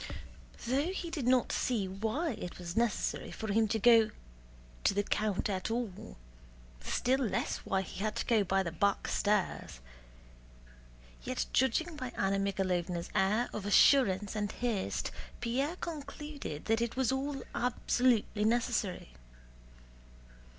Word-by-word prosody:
Though 265 +5 +1
he 345 -3 -4
did 285 -7 -2
not 255 -1 +3
see 225 -6 0
why 220 - -1
it 195 -6 -6
was 175 -1 -6
necessary 235 -2 0
for 220 -2 -4
him 220 +1 +3
to 220 - 0
go 225 0 +6 0.7
to - - +3
the 205 - +2
count 210 -1 0
at 190 -1 -2
all, 225 - -4 0.6
still 255 - +1
less 245 -6 -1
why 190 0 -1
he 185 - -9
had 215 +1 -1
to - - -2
go 225 -3 +3
by 195 0 +1
the 170 - -3
back 200 +5 +1
stairs, 205 - 0 1.4
yet - - -2
judging 300 +6 +1
by 255 -3 -4
Anna 195 +1 +1
Mikháylovna's 185 -3 -1
air 215 +5 +2
of 210 - -4
assurance 205 -2 +4
and 210 -1 -1
haste, 230 -6 -2 0.3
Pierre 270 +8 -1
concluded 295 - -6
that 225 +1 +2
it 235 -1 -1
was 260 -1 +1
all 270 +1 -2
absolutely 245 -3 +1
necessary. 225 - 0
220 Hz, 135 wpm, -32 LUFS, 195-255 Hz, 1.4 s, go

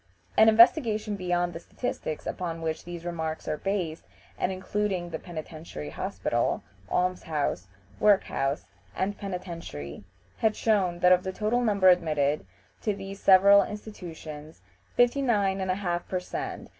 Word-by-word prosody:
" - - -38
An 220 0 +7
investigation 220 -2 +5
beyond 175 -2 0
the 165 - -6
statistics 170 -5 -4
upon 165 -2 -4
which 160 0 -3
these 175 -1 -7
remarks 160 -2 -3
were 155 - -2
based, 185 -5 -2 0.3
and 185 - -1
including 190 -2 -2
the 160 - -4
Penitentiary 155 - -7
Hospital, - - -1 0.3
Alms 180 0 +1
house, 145 - -2 0.3
Work 205 -2 +5
house 135 -5 -2 0.3
and 200 +2 -1
Penitentiary, 170 - -6 0.3
had 220 -2 +2
shown 185 -6 +1
that 180 - +6
of 180 0 +6
the 190 - -3
total 215 +5 0
number 200 -4 +3
admitted 150 - +2 0.3
to 210 -2 0
these 195 0 -8
several 200 +1 +7
institutions 165 -8 -8 0.3
59 240 -6 +3
1/2 185 -2 -1
per 185 - -1
cent. 180 - -5
180 Hz, 140 wpm, -27 LUFS, 165-205 Hz, 0.3 s, An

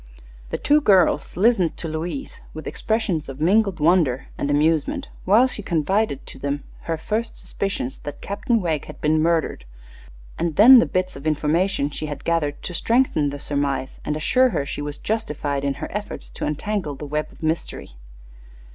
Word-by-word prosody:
The - - -2
two 295 +1 +3
girls 185 - +3
listened 195 -4 +3
to 165 - -3
Louise 165 - -5
with - - -7
expressions 215 -9 -1
of 135 +1 -8
mingled 195 +2 +2
wonder 155 -5 +2
and 140 - -2
amusement 160 - +1 0.2
while 215 +7 +6
she 255 -5 -4
confided 175 -1 0
to - - -10
them 140 0 -2 0.3
her 165 - 0
first 220 +7 -3
suspicions 195 -10 -3
that 145 - -7
Captain 225 +3 -1
Wegg 160 -5 -1
had - - -11
been 155 +1 +2
murdered, 165 0 +1 0.8
and 165 -2 -1
then 245 +5 +9
the - - +2
bits 185 0 -1
of 140 +3 -6
information 155 +1 +1
she 155 - -4
had 145 -1 -6
gathered 155 -4 -1
to 180 - -4
strengthen 200 - +2
the 140 0 -6
surmise 140 -2 -2
and 150 - -2
assure 255 +11 +3
her 140 - -1
she 145 - -5
was 145 0 -4
justified 150 -9 -2
in 140 -1 0
her 140 - -6
efforts 210 0 -6
to - - -4
untangle 155 0 -2
the 150 - -7
web 150 +1 -3
of - - -15
mystery. 160 - -2
160 Hz, 175 wpm, -23 LUFS, 145-205 Hz, 0.8 s, then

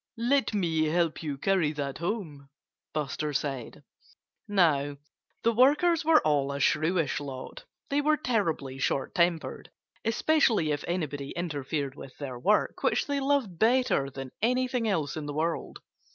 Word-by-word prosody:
"Let 245 +1 +2
me 165 -5 +1
help 165 +1 0
you 150 -4 -4
carry 180 -1 +2
that 140 -2 -4
home!" 170 -7 -4 0.4
Buster 150 0 -2
said. 135 -4 -3 0.6
Now, 145 -8 +2 0.5
the 230 - +4
workers 300 +8 +4
were 315 0 +5
all 145 -2 +2
a 140 - -4
shrewish 155 +2 +1
lot. 135 -3 -8 0.3
They 285 +1 +2
were 305 +1 +3
terribly 165 - -1
short 135 0 -1
tempered 170 -3 0 0.3
especially 225 - +2
if 145 - -2
anybody 145 -5 -3
interfered 145 -4 -3
with 135 -2 -11
their 130 -4 -6
work, 210 +10 +1
which - - +1
they 285 -1 -1
loved 270 - 0
better 230 - +3
than 135 -1 -7
anything 250 0 +1
else 160 -9 0
in 155 -2 -5
the 145 - -5
world. 165 +2 -2
165 Hz, 145 wpm, -28 LUFS, 145-230 Hz, 0.6 s, were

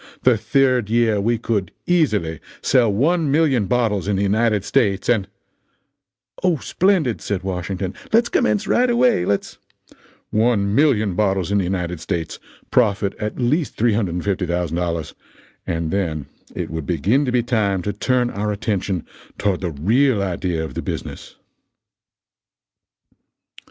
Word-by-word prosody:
The 125 -2 +5
third 125 -1 +1
year 115 -3 +2
we 115 +3 +1
could 105 -5 -2
easily 105 - +1 0.2
sell 125 -5 +3
1,000,000 145 - +2
bottles 110 -6 +1
in 105 - +1
the 95 - 0
United 105 0 +1
States 100 -3 +1
and 110 -5 +2 0.6
" - - -26
"O, 180 -3 +3
splendid!" 170 - +1
said 100 -2 -3
Washington. 95 0 -3 0.2
"Let's 230 +2 +4
commence 105 - +1
right 250 +1 +2
away 240 - +3
let's 100 +1 -2 0.3
" - - -26
" - - -33
1,000,000 110 - +2
bottles 95 -2 0
in 100 - +3
the 95 - 0
United 90 -2 -2
States 80 0 -4 0.3
profit 100 -4 +2
at 105 0 -4
least 140 +5 0
$350,000 90 -5 -1 0.5
and 80 -1 -2
then 80 -7 -1 0.3
it - - -4
would 80 -2 -5
begin 105 - +2
to 125 - -1
be 125 -1 +2
time 105 -6 0
to 105 - -2
turn 125 +3 0
our 105 +1 -2
attention 100 -4 -2 0.3
toward 100 -3 0
the 90 - -1
real 105 - +2
idea 90 -3 -2
of - - -8
the - - -4
business." - - -6
105 Hz, 140 wpm, -21 LUFS, 95-125 Hz, 0.6 s, The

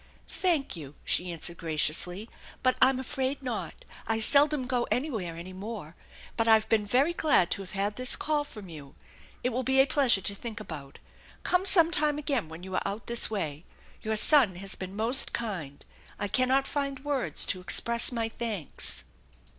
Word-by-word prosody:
" - - -31
Thank 335 - -1
you," 150 -3 -10
she 180 0 0
answered 170 +1 -5
graciously, 170 +5 +1 0.3
" 255 -1 0
I'm 260 0 +5
afraid 265 +1 -3
not. 245 -4 -5 0.2
I 225 0 0
seldom 285 +3 +4
go 250 -1 -1
anywhere 225 - -2
any 175 +3 -9
more. 190 -4 -8 0.4
But 225 -1 0
I've 220 -1 +5
been 210 -2 +1
very 270 +10 +2
glad 295 - +2
to - - 0
have 190 0 -11
had 200 +1 -2
this 255 0 +4
call 300 -1 -1
from 210 -9 -11
you. 145 -5 -12 0.5
It 250 - +1
will 255 +1 -2
be 265 +1 +1
a 270 - +7
pleasure 260 -7 +3
to 200 - -3
think 220 +1 -7
about. 150 -9 -9 0.5
Come 365 +2 +2
sometime 320 -5 +5
again 275 - -2
when 160 +2 -10
you 190 0 -8
are - - 0
out 200 +2 -5
this 235 0 +2
way. 160 -8 -4 0.4
Your 220 0 -2
son 230 - +4
has 195 +2 -4
been 190 +1 -7
most 230 +5 +2
kind. 180 -12 -5 0.3
I 205 - -2
cannot 255 +5 +2
find 275 -1 -4
words 285 -3 0
to 185 - -2
express 235 +6 +4
my 230 -2 -2
thanks." 225 -8 -4
225 Hz, 180 wpm, -28 LUFS, 185-265 Hz, 0.5 s, a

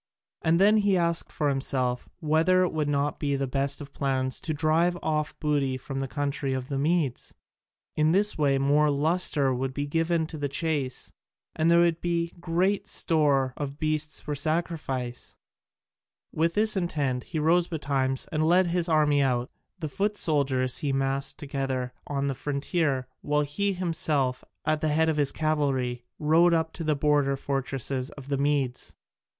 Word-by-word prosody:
And 165 +1 +2
then 210 +3 +5
he 200 -2 +3
asked 170 -1 0
himself 135 -3 0
whether 165 +4 +3
it 180 - -1
would 155 -2 -1
not 145 0 0
be 145 -1 0
the 135 0 -1
best 135 +1 -1
of 145 -1 -10
plans 130 -2 0
to 160 - -3
drive 160 +3 +2
off 155 -1 -1
booty 140 -4 0
from 135 +1 -6
the 135 - -2
country 140 0 -2
of 130 0 -5
the 135 -1 -2
Medes? 150 -4 -1 0.6
In 155 +1 +3
this 205 +4 +3
way 140 -3 +2
more 145 +2 +3
lustre 145 -2 +2
would 130 +1 -3
be 145 - -1
given 165 +2 0
to 155 -1 -8
the 145 -1 -2
chase, 140 -3 -2 0.4
and 160 +1 +2
there 170 0 +6
would 170 -1 +2
be 170 -1 -1
great 180 +4 0
store 140 -5 +2
of 140 -1 -5
beasts 155 0 -1
for 150 - -5
sacrifice. 145 -5 -3 1.0
With 165 +1 0
this 215 +1 +2
intent 145 -9 -1
he - - -5
rose 170 +3 +3
betimes 135 -5 -1
and 155 -1 0
led 180 +4 +4
his 175 0 0
army 150 -2 +3
out: 125 -2 0 0.3
the 165 -4 -4
foot 205 +8 -1
soldiers 135 -6 0
he 145 -3 -1
massed 135 0 -1
together 135 -3 -3
on 140 -1 -1
the 140 - 0
frontier, 140 0 -1
while 150 0 +1
he 195 +8 -1
himself, 155 -7 0 0.2
at 155 0 +1
the 155 - +1
head 160 +2 +2
of 155 - 0
his 145 -2 +1
cavalry, 135 -6 -1
rode 165 +3 +4
up 160 0 -1
to 165 - -6
the 155 -1 +1
border 145 -1 +2
fortresses 135 -1 -3
of 140 -1 -11
the 140 - 0
Medes. 140 -3 -1
150 Hz, 170 wpm, -27 LUFS, 135-165 Hz, 1.0 s, there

